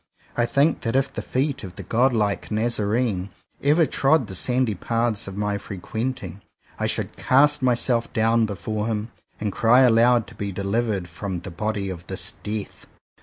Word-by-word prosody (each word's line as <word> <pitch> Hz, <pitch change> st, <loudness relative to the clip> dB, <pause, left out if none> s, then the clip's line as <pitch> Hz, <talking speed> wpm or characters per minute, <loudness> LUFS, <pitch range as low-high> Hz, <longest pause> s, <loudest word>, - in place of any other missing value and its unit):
I 120 Hz, 0 st, +2 dB
think 140 Hz, +6 st, +2 dB
that 115 Hz, +1 st, -2 dB
if 135 Hz, 0 st, +1 dB
the -, -, -3 dB
feet 135 Hz, 0 st, -1 dB
of 90 Hz, -2 st, -8 dB
the -, -, -7 dB
god 125 Hz, +4 st, +2 dB
like 105 Hz, -4 st, 0 dB
Nazarene 110 Hz, -2 st, 0 dB, 0.3 s
ever 155 Hz, +4 st, +4 dB
trod 135 Hz, -1 st, +2 dB
the 95 Hz, -, -8 dB
sandy 125 Hz, +3 st, +1 dB
paths 115 Hz, +2 st, -1 dB
of 100 Hz, 0 st, -7 dB
my 105 Hz, 0 st, -1 dB
frequenting, 100 Hz, 0 st, -5 dB, 0.4 s
I -, -, 0 dB
should -, -, -3 dB
cast 145 Hz, +2 st, +4 dB
myself 120 Hz, -1 st, +1 dB
down 115 Hz, 0 st, +2 dB
before 105 Hz, +2 st, -3 dB
Him, 110 Hz, 0 st, -3 dB, 0.3 s
and 105 Hz, -2 st, -2 dB
cry 115 Hz, +6 st, +4 dB
aloud 120 Hz, -1 st, +5 dB
to -, -, -12 dB
be 100 Hz, -1 st, -4 dB
delivered 100 Hz, 0 st, -1 dB
from 90 Hz, 0 st, -5 dB
"the 95 Hz, -, -8 dB
body 100 Hz, +1 st, -2 dB
of 85 Hz, -1 st, -9 dB
this -, -, -2 dB
death. 105 Hz, -1 st, -6 dB
110 Hz, 170 wpm, -23 LUFS, 100-125 Hz, 0.4 s, aloud